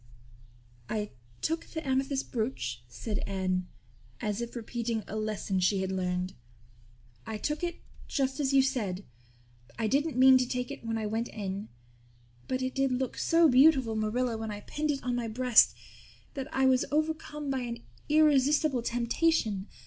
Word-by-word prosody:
"I 210 Hz, -1 st, -2 dB, 0.3 s
took 325 Hz, +1 st, 0 dB
the 320 Hz, -3 st, -6 dB
amethyst 270 Hz, +1 st, 0 dB
brooch," 125 Hz, -, -2 dB
said 205 Hz, -, -4 dB
Anne, 185 Hz, -2 st, -1 dB, 0.5 s
as 210 Hz, +1 st, -2 dB
if 235 Hz, +1 st, -5 dB
repeating 230 Hz, -1 st, -3 dB
a 215 Hz, -, -6 dB
lesson 215 Hz, -3 st, -1 dB
she 190 Hz, +2 st, +2 dB
had 190 Hz, 0 st, -2 dB
learned. 180 Hz, 0 st, -1 dB, 0.9 s
"I 220 Hz, -, -3 dB
took 300 Hz, +8 st, -2 dB
it 345 Hz, -1 st, -3 dB, 0.3 s
just 270 Hz, 0 st, -1 dB
as 280 Hz, -2 st, +1 dB
you 270 Hz, -1 st, +5 dB
said. 210 Hz, -8 st, -2 dB, 0.7 s
I 225 Hz, -, -1 dB
didn't 280 Hz, +5 st, +1 dB
mean 260 Hz, 0 st, +8 dB
to 250 Hz, -, 0 dB
take 250 Hz, +1 st, -2 dB
it 280 Hz, -, -8 dB
when 225 Hz, 0 st, -2 dB
I 220 Hz, -, -2 dB
went 225 Hz, +3 st, -1 dB
in. 200 Hz, 0 st, -5 dB, 0.8 s
But 255 Hz, 0 st, -1 dB
it 255 Hz, -, -2 dB
did 270 Hz, -1 st, +1 dB
look 255 Hz, 0 st, -1 dB
so 330 Hz, 0 st, +4 dB
beautiful, 265 Hz, -4 st, +5 dB
Marilla, 225 Hz, +2 st, 0 dB
when 220 Hz, 0 st, -4 dB
I 205 Hz, 0 st, -5 dB
pinned 305 Hz, +7 st, -3 dB
it 280 Hz, -2 st, -1 dB
on 250 Hz, 0 st, -1 dB
my 240 Hz, -1 st, -2 dB
breast 245 Hz, +1 st, +5 dB, 0.6 s
that 275 Hz, 0 st, -5 dB
I 265 Hz, 0 st, +2 dB
was 260 Hz, -1 st, +4 dB
overcome 300 Hz, -1 st, -1 dB
by 265 Hz, -, 0 dB
an 235 Hz, -1 st, -5 dB, 0.3 s
irresistible 295 Hz, -2 st, +4 dB
temptation. 235 Hz, -3 st, +1 dB
245 Hz, 165 wpm, -30 LUFS, 215-270 Hz, 0.9 s, mean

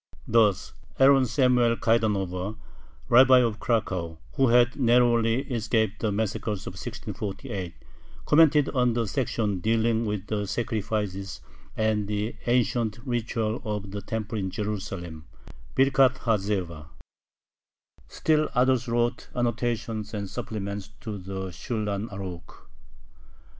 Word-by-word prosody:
Thus 105 Hz, -5 st, +2 dB, 0.2 s
Aaron 135 Hz, -1 st, +6 dB
Samuel 125 Hz, -2 st, +3 dB
Kaidanover, 105 Hz, -3 st, 0 dB, 0.5 s
Rabbi 130 Hz, +2 st, +7 dB
of 115 Hz, -4 st, +1 dB
Cracow, 95 Hz, -8 st, -1 dB, 0.2 s
who 135 Hz, -, +3 dB
had 120 Hz, +1 st, +4 dB
narrowly 120 Hz, -2 st, +3 dB
escaped 110 Hz, -5 st, -1 dB
the 110 Hz, -, 0 dB
massacres 105 Hz, -1 st, -2 dB
of -, -, -6 dB
1648, 100 Hz, -4 st, -6 dB, 0.5 s
commented 150 Hz, -2 st, +5 dB
on 125 Hz, -3 st, +2 dB
the 115 Hz, 0 st, 0 dB
section 110 Hz, -4 st, -1 dB
dealing 115 Hz, +2 st, +1 dB
with 105 Hz, -2 st, -3 dB
the 105 Hz, -1 st, -2 dB
sacrifices 105 Hz, -3 st, -3 dB, 0.4 s
and 110 Hz, -2 st, +1 dB
the 105 Hz, +2 st, -2 dB
ancient 120 Hz, -3 st, +1 dB
ritual 115 Hz, -2 st, -2 dB
of 105 Hz, -2 st, -4 dB
the 100 Hz, 0 st, -5 dB
temple 110 Hz, +1 st, -4 dB
in 95 Hz, -1 st, -2 dB
Jerusalem 95 Hz, -5 st, -5 dB, 0.5 s
(Birkhath 135 Hz, -1 st, +4 dB
ha 115 Hz, -3 st, +1 dB
Zebah). 90 Hz, -7 st, -3 dB, 1.2 s
Still 155 Hz, -1 st, +1 dB
others 125 Hz, -1 st, +3 dB
wrote 120 Hz, +1 st, -1 dB
annotations 115 Hz, -3 st, -2 dB
and 100 Hz, -1 st, -3 dB
supplements 100 Hz, -2 st, -5 dB
to 105 Hz, -3 st, -5 dB
the 95 Hz, 0 st, -5 dB
Shulhan 105 Hz, +2 st, -3 dB
Arukh. 95 Hz, -4 st, -8 dB
110 Hz, 115 wpm, -26 LUFS, 100-120 Hz, 1.2 s, Rabbi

